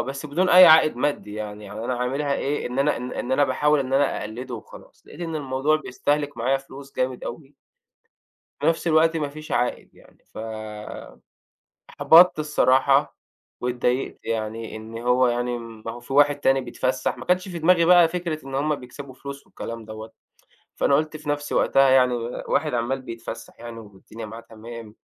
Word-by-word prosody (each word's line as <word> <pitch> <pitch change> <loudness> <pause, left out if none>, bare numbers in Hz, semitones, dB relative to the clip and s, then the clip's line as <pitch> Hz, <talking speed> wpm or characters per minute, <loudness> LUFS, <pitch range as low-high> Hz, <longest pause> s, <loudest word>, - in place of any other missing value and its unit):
بس 135 +3 -4
بدون 175 +6 0
أي 180 0 +9
عائد 160 -4 +6
مادّي 125 -7 -2
يعني، 105 -1 -6
يعني 105 +3 -7
أنا 125 - -1
عاملها 140 +3 -1
إيه، 145 +2 -2
إن 125 +2 -5
أنا 145 +2 +2
إن 125 0 -6
إن 125 - -3
أنا 145 +2 +4
باحاول 150 +1 +2
إن 130 -1 -4
أنا 140 +1 +2
أقلّده 120 +4 -6
وخلاص، 110 - -13
لقيت 150 - -13
إن 165 -2 -3
الموضوع 140 +1 +1
بيستهلِك 145 0 -2
معايا 125 +4 +1
فلوس 135 0 -12
جامد 130 -1 -2
أوي. 145 -2 -8 1.1
في - - -1
نَفْس 165 +1 +1
الوقت 160 0 +4
ما 150 -3 -1
فيش 155 +2 -10
عائد 120 0 -1
يعني، - - -21 0.2
فأُحبَطت 110 -1 -8 1.1
الصراحة 140 -2 +2 0.4
وإتضايقت 125 +1 -1
يعني 115 0 -4
إن 110 +1 -8
هو 125 +2 +3
يعني 120 0 -1
ما 115 -1 -8
هو 120 - -10
في 120 +3 -9
واحد 145 0 +5
تاني 135 -1 +3
بيتفسّح، 130 0 -2
ما 125 - -8
كانش 180 +1 +1
في 175 -2 -5
دماغي 170 +1 +4
بقى 175 -1 +6
فكرة 170 -3 -4
إن 135 - -7
هُم 150 +2 +1
بيكسَبوا 130 +1 -10
فلوس 140 +1 -9
والكلام 115 -1 -7
دوّة، 110 +1 -9 0.6
فأنا 140 - +2
قُلت 155 +1 -1
في 155 -1 -8
نفسي 145 0 -2
وقتها 135 0 +4
يعني 130 -1 +4 0.3
واحد 150 -1 0
عمّال 120 +3 -1
بيتفسّح 115 -3 -8
يعني 120 -1 -8
والدنيا 110 +1 -11
معاه 115 +2 -9
تمام 115 -1 -11
130 Hz, 175 wpm, -24 LUFS, 115-150 Hz, 1.1 s, أي